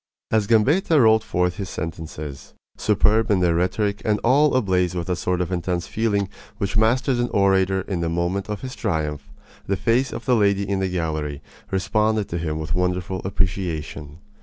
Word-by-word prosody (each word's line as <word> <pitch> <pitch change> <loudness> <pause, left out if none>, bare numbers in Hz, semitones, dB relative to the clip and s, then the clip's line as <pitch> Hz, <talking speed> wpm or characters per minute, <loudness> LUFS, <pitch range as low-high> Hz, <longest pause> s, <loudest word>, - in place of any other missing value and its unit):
As 110 -2 +2
Gambetta 145 - +3
rolled 110 -2 +5
forth 90 0 0
his 95 -2 -4
sentences, 75 -3 -7 0.2
superb 110 +1 +2
in 100 -3 +3
their 90 -2 +3
rhetoric 100 +4 0
and 105 -1 +1
all 140 +4 +4
ablaze 90 -7 +1
with 85 -1 -2
that 90 -1 -1
sort 90 0 -1
of 90 0 -2
intense 90 -1 -1
feeling 105 -3 0 0.3
which 100 -2 -2
masters 120 +4 +2
an 120 - 0
orator 95 -1 +2
in 95 -1 -3
the 85 -1 -1
moment 85 +4 -1
of 105 - -4
his 130 -1 -6
triumph, 75 - -3 0.4
the 100 - 0
face 120 +5 +1
of - - -6
the 125 - +3
lady 100 -2 +2
in 100 -1 0
the 95 -1 0
gallery 80 -5 -2 0.3
responded 105 +2 +1
to 85 - -3
him 80 -2 -2
with 80 -1 -4
wonderful 90 +1 -1
appreciation. 85 -6 -3
95 Hz, 180 wpm, -23 LUFS, 85-110 Hz, 0.4 s, rolled